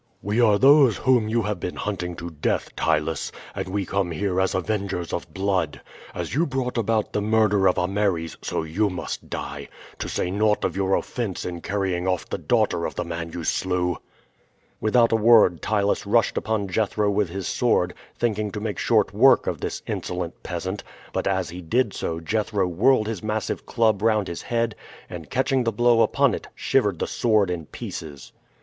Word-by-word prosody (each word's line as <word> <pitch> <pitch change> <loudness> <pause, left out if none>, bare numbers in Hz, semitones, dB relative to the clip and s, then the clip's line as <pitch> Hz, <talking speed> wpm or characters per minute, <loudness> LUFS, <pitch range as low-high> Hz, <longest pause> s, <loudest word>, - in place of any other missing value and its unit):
"We 105 +4 +1
are 105 -3 +5
those 135 -2 +6
whom 125 -5 +2
you 115 +1 +1
have 105 -2 -2
been 90 - -4
hunting 90 -4 -3
to 85 0 -7
death, 75 -2 -2
Ptylus; 80 -1 0 0.2
and - - -4
we 100 +1 -2
come 100 -2 -1
here 95 +2 0
as 95 - 0
avengers 95 -2 -2
of 85 -1 -4
blood. 95 -4 -1 0.4
As - - -4
you 165 +5 +2
brought 130 -2 -2
about 110 -2 0
the 105 - 0
murder 105 -2 +3
of 90 - 0
Ameres, 90 -3 0
so - - -2
you 95 +7 0
must 90 - -6
die - - -5 0.3
to - - -3
say 90 - -1
naught 105 +2 +2
of - - -2
your 95 0 +2
offense 115 -7 -3
in 85 -1 -5
carrying 95 -2 -1
off 90 -3 -1
the - - -4
daughter - - +1
of - - -8
the - - -2
man 85 0 -5
you 85 - -5
slew." 90 0 0 0.8
Without 115 +2 +3
a - - +4
word 110 -6 +5
Ptylus 100 -1 0
rushed 115 +2 +3
upon 110 -2 -1
Jethro 105 +1 0
with 100 -2 +1
his 95 +1 -4
sword, - - +1 0.2
thinking 105 -3 0
to 105 - -3
make 105 -3 -3
short - - +2
work - - +5
of - - -3
this - - -4
insolent 90 -1 -4
peasant; 95 +2 -4 0.3
but - - -1
as 95 -3 0
he 90 +1 -7
did 115 +6 +1
so, 80 0 -3
Jethro 105 +3 0
whirled 110 +7 +3
his 110 -5 -3
massive 110 -1 -3
club 110 -4 +2
round 110 -3 +2
his 85 - -5
head, 115 -1 -1 0.4
and 85 -3 -8
catching 130 0 +1
the 115 - +1
blow 120 +1 +4
upon 110 - +3
it, - - -5
shivered - - +1
the - - -1
sword 105 -5 +2
in 85 -4 -4
pieces. 70 -4 -8
100 Hz, 190 wpm, -24 LUFS, 90-110 Hz, 0.8 s, those